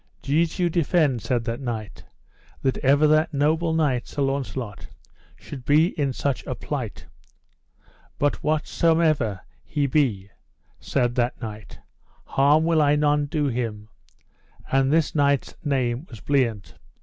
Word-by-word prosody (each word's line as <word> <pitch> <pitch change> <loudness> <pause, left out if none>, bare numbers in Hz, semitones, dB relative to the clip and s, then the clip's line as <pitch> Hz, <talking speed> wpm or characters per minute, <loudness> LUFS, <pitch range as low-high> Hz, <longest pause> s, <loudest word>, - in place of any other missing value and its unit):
Jesu 165 +4 +1
defend, 160 -6 +1
said 120 0 -1
that 115 0 -3
knight, 115 -5 -5 0.6
that 130 - 0
ever 140 +3 +4
that 155 +1 +3
noble 160 +4 +1
knight, 150 -7 0
Sir 145 - -2
Launcelot, 135 -6 -3 0.5
should 135 -4 -10
be 155 +6 +4
in 140 -6 -1
such 135 +1 -2
a - - -3
plight; - - -5 1.1
but 145 0 0
whatsomever 155 - +1 0.2
he 145 -2 -1
be, 120 -9 0 0.5
said 120 -3 0
that 120 0 -1
knight, 110 -3 -8 0.5
harm 145 +3 +3
will 165 -1 +3
I 145 0 +4
none 150 0 +2
do 150 0 -1
him: 115 -5 -3 0.8
and 135 0 +3
this 160 0 +2
knight's 140 -3 +1
name 130 0 -1
was 115 - -10
Bliant. 120 -8 0
140 Hz, 130 wpm, -24 LUFS, 120-155 Hz, 1.1 s, ever